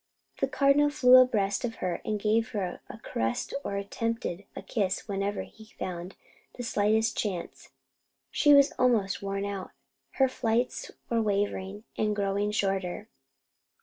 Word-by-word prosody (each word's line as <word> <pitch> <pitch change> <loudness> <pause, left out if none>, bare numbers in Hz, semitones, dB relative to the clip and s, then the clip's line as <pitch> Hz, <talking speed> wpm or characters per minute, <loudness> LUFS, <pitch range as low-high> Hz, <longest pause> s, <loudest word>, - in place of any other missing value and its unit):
The - - +2
Cardinal 280 +1 +4
flew 255 -3 +7
abreast 215 -6 +3
of 230 -2 -2
her 180 -2 -3
and 215 -1 -2
gave 220 +2 +1
her 190 -4 -3
a - - -8
caress 115 - -3
or 200 - -3
attempted 200 -2 -3
a - - -7
kiss 195 -4 -1
whenever 200 0 -2
he 220 0 -16
found 180 0 -5 0.4
the 245 - -6
slightest 220 0 +1
chance. 185 -5 -4 0.6
She 295 - +4
was 280 0 +6
almost 220 -6 +2
worn 195 0 -2
out, 200 -2 -5 0.4
her 265 - +4
flights 240 -1 -1 0.2
were 230 -1 +2
wavering 205 -1 -1 0.2
and 210 -1 +1
growing 200 0 0
shorter. 195 0 -2
210 Hz, 145 wpm, -28 LUFS, 195-230 Hz, 0.6 s, flew